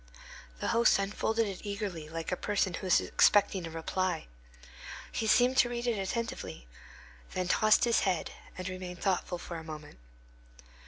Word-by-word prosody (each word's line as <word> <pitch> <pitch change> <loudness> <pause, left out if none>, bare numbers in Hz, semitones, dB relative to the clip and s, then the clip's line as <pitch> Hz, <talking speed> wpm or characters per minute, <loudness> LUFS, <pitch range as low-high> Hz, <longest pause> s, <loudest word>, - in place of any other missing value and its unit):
The - - -1
host 235 +1 +4
unfolded 215 +3 0
it 195 -2 -6
eagerly, 200 -7 -4
like 165 +2 -5
a - - +1
person 200 -1 0
who 185 - -4
is 180 - +5
expecting 195 -4 +3
a - - -6
reply. 165 +1 -2 0.9
He 220 - -2
seemed 250 +3 +4
to 240 - +5
read 240 0 -3
it 235 -4 0
attentively, 195 - -4 0.7
then 185 -1 -1
tossed 215 +4 +4
his 235 -1 +4
head, 185 -4 0 0.3
and 185 0 -4
remained 185 -1 -6
thoughtful 185 -2 0
for 170 0 -7
a 160 - -8
moment. 155 - -9
190 Hz, 160 wpm, -31 LUFS, 175-215 Hz, 0.9 s, is